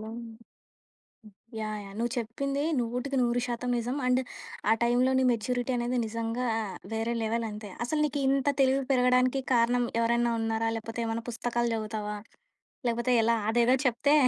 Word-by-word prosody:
హ్మ్. 225 +2 -7 1.3
Yeah! 215 -1 -3
Yeah! 195 - -10
నువ్వు 235 0 -1
చెప్పింది 275 +5 -2 0.2
నూటికి 250 +4 -2
నూరు 240 0 +1
శాతం 245 +1 -2
నిజం. 245 +4 -2
అండ్ 255 +1 +3 0.5
ఆ - - +7
టైంలో 245 +2 +3
నీ - - +3
మెచ్యూరిటీ 245 +3 -1
అనేది 245 +1 -1
నిజంగా 230 +2 -2 0.5
వేరే 225 +1 -1
లెవెల్ 225 +1 0
అంతే. 210 -1 -8
అసలు 300 +5 -1
నీకు 285 0 -3
ఇంత 275 +1 +2
తెలివి 270 +1 +4
పెరగడానికి 255 +1 +3
కారణం 240 +1 +3 0.2
ఎవరైనా 235 0 +2
ఉన్నారా? 225 0 0
లేపోతే 225 +1 -6
ఏమైనా 225 0 -3
పుస్తకాలు 240 0 -1
జదువుతావా? 215 -1 -3 0.7
లేపోతే 235 +2 0
ఎలా? 230 +1 +3
అదేదో 240 +3 +4
చెప్తే 255 +4 +3
235 Hz, 145 wpm, -28 LUFS, 225-250 Hz, 1.3 s, ఆ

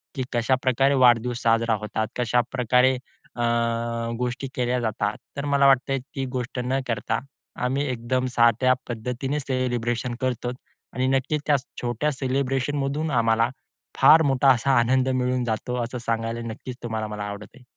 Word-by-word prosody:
की 130 - -2
कशाप्रकारे 130 +3 +2
वाढदिवस 120 +1 +2
साजरा 115 0 +3
होतात, 110 +1 -2
कशाप्रकारे 125 +2 +2 0.4
अ, 120 - -4 0.8
गोष्टी 125 +2 -3
केल्या 125 0 0
जातात. 110 -2 -1 0.2
तर 140 - -3
मला 140 -1 +4
वाटतंय, 135 0 +3
ती 135 +1 -6
गोष्ट 125 0 -3
न 135 +2 0
करता 115 - -1 0.5
आम्ही 135 +3 0
एकदम 125 +1 -1
साध्या 120 +2 +4 0.2
पद्धतीने 125 +5 -3
सेलिब्रेशन 125 -2 -2
करतोचं 125 -1 -2 0.4
आणि 130 0 +1
नक्कीचं 135 +3 0
त्या 145 -1 +4 0.2
छोट्या 120 +5 -1
सेलिब्रेशनमधून 135 +3 -1
आम्हाला 115 -1 +2 0.5
फार 160 - +7
मोठा 135 -1 +3
असा 130 +2 +2
आनंद 130 +2 +2
मिळून 125 -1 0
जातो, 125 +2 -2
असं 125 +2 -5
सांगायला 115 0 -2
नक्कीचं 120 +2 -8
तुम्हाला 110 -2 -3
मला 105 -1 -5
आवडत 100 0 -6
आहे. 130 - -17
125 Hz, 140 wpm, -24 LUFS, 115-135 Hz, 0.8 s, फार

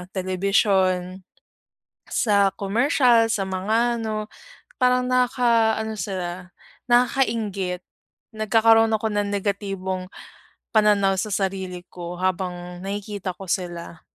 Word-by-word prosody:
telebisyon, 185 -1 +1 0.9
sa 200 -4 +3
komersyal, 230 +2 +3
sa 195 - 0
mga 220 +6 0
ano. 215 -1 -3 0.5
Parang 250 0 +3
nakaka-ano 235 -3 +2
sila, 180 -1 -5 0.4
nakakainggit, 225 -7 +1 0.6
nagkakaroon 225 +1 +4
ako 220 +1 0
ng 205 0 0
negatibong 195 -2 -3 0.7
pananaw 205 -3 +4
sa 215 - -2
sarili 190 -2 -3
ko 175 0 -7
habang 180 -1 -3
nakikita 200 -1 -4
ko - - -9
sila. 170 -2 -4
200 Hz, 95 wpm, -23 LUFS, 185-225 Hz, 0.9 s, nagkakaroon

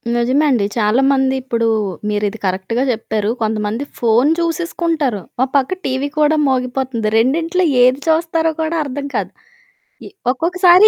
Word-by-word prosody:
నిజమే 255 +6 +2
అండి. 230 -6 +2
చాలామంది 265 +5 +2
ఇప్పుడు 230 -3 -1 0.4
మీరిది 210 +1 -1
కరెక్ట్‌గా 190 +7 -1
చెప్పారు. 220 -2 -2
కొంతమంది 215 +2 -1 0.2
ఫోను 240 +5 +3
చూసేసుకుంటారు, 330 - -1 0.2
ఓ - - +5
పక్క 280 +7 +1
టీవీ 265 +2 -1
కూడా 300 +1 +4
మోగిపోతుంది 250 -3 -1
రెండింట్లో 330 +10 +1 0.2
ఏది 255 +2 +4
చూస్తారో 325 0 +1
కూడా 320 +1 -1
అర్థం 280 0 -5
కాదు. - - -2 0.7
ఇ - - -8 0.2
ఒక్కొక్కసారి 360 +7 +5
265 Hz, 125 wpm, -17 LUFS, 225-320 Hz, 0.7 s, ఓ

